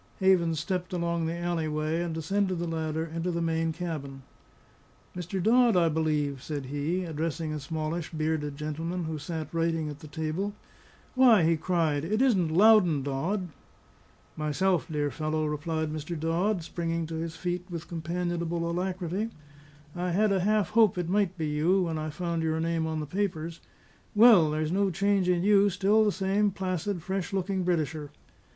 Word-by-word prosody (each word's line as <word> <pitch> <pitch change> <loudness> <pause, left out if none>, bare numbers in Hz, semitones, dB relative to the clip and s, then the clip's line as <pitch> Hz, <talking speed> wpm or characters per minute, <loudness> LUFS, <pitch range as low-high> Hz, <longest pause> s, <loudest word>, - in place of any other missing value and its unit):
Havens 175 -5 +3
stepped 180 +1 -3
along 170 -1 -1
the 165 +1 -3
alley 170 -2 -1
way, 155 +2 -1
and 175 -1 -2
descended 185 +4 -1
the 170 - -2
ladder 160 -1 -2
into 165 +2 -3
the 170 -1 -1
main 165 -1 0
cabin. 155 -5 -5 0.9
"Mr. 180 +2 -4
Dodd, 235 -1 +5
I 170 -2 +4
believe," 150 -4 0
said 145 -2 -5
he, 145 +7 -2
addressing 160 0 -3
a 155 - -3
smallish, 155 +3 -3
bearded 155 -2 -2
gentleman, 165 +4 -3
who 160 -1 -4
sat 160 +2 -5
writing 165 -2 0
at 145 -1 -8
the 155 - -11
table. 160 +6 -3 0.6
"Why," 245 -8 +6
he 165 +1 +4
cried, 160 -3 0
"it 210 +7 0
isn't 210 -11 +3
Loudon 180 -5 +5
Dodd?" 175 +8 -2 0.9
"Myself, 155 +1 0
my 160 - -5
dear 145 -1 0
fellow," 155 0 -1
replied 155 +1 -2
Mr. 155 +2 -5
Dodd, 170 +4 0
springing 165 0 -2
to 165 - -7
his 165 0 -4
feet 180 0 -3
with 170 -1 -6
companionable 170 0 -2
alacrity. 185 +3 -2 0.7
"I 175 0 -2
had 210 +3 +3
a 195 - +2
half 205 -1 +1
hope 215 -4 +4
it 175 -1 -2
might 190 -2 +1
be 160 - -2
you, 160 +6 +2
when 165 -2 -2
I 155 0 -3
found 170 +1 -2
your 160 0 0
name 165 0 0
on 160 -1 -2
the - - -4
papers. 170 -1 -3 0.6
Well, 210 -8 +7
there's 155 +1 -1
no 195 +1 +2
change 195 +1 +1
in 175 -1 +2
you; 205 0 +5
still 200 +4 +3
the 210 - +3
same 195 +2 +1
placid, 185 -2 -3
fresh 190 0 -3
looking 190 0 -1
Britisher." 160 -4 -1
170 Hz, 170 wpm, -28 LUFS, 155-185 Hz, 0.9 s, Well